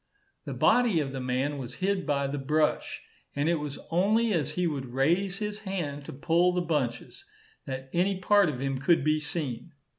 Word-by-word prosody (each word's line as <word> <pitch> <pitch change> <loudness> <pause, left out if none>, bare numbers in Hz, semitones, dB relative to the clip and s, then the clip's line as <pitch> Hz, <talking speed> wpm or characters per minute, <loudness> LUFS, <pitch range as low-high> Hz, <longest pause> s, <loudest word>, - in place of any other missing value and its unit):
The - - -5
body 240 -8 +4
of 140 -3 -2
the 135 - -4
man 130 +3 -1
was 125 -1 -6
hid 190 -1 -1
by 140 -1 +1
the 140 +1 -3
brush, 150 +3 0 0.3
and 145 +2 0
it 170 -1 +2
was 150 -1 -5
only 215 +6 +3
as 150 -3 -1
he 180 +2 0
would 140 -5 -2
raise 175 +8 +2
his 210 0 -3
hand 170 -9 -4
to - - -7
pull 170 +6 +2
the 180 - +1
bunches, 145 - -2 0.4
that 130 0 -5
any 185 +3 +1
part 200 -1 +4
of 130 -4 -4
him 135 0 -2
could 150 +3 +3
be 155 +1 +2
seen. 150 -2 -4
155 Hz, 190 wpm, -28 LUFS, 135-180 Hz, 0.4 s, body